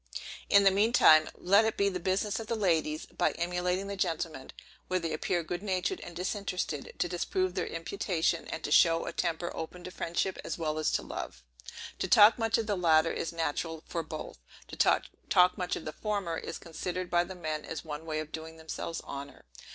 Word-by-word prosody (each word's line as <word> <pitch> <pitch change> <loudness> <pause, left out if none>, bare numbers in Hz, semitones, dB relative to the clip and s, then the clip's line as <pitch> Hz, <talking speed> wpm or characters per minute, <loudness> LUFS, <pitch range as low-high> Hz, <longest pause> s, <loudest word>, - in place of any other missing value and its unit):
In 200 0 +7
the 195 - +6
mean 210 +5 +2
time, 155 -8 +7
let 200 +4 +4
it 220 - -1
be 200 - +3
the 185 -2 -1
business 190 +4 0
of 225 - -6
the 230 - -1
ladies, 160 -7 +1
by - - 0
emulating 180 +2 -1
the 200 0 -4
gentlemen, 165 -7 -2 0.4
where 185 0 +1
they 165 -2 -3
appear 175 -2 -1
good 175 +2 -4
natured 195 - -1
and 175 - -9
disinterested, 180 -5 -3
to - - +1
disprove 180 +1 -1
their 180 -2 -2
imputation, 165 -1 -1
and 160 - -5
to - - -3
show 165 +1 +5
a - - -4
temper 170 0 -2
open 175 +2 -6
to 185 - -7
friendship 180 +2 -2
as - - -4
well 155 -2 -2
as 155 - +1
to - - +1
love. 60 - -6 0.6
To - - 0
talk 210 +3 +7
much 225 -1 +2
of 225 - -1
the 210 -1 0
latter 165 -2 +4
is - - -3
natural 160 0 -2
for 170 - -3
both; 155 - -7 0.3
to - - -7 0.5
talk 180 0 +5
much 180 -1 -2
of - - -7
the 155 - -4
former, 200 -5 -2
is - - -5
considered 180 +2 -5
by 175 0 +4
the 185 +2 -8
men 155 -3 -3
as 165 - -6
one 150 0 -5
way 155 -1 -1
of 155 0 -9
doing 160 0 -7
themselves 160 +1 -5
honor. 140 - -8
175 Hz, 205 wpm, -30 LUFS, 160-190 Hz, 0.6 s, In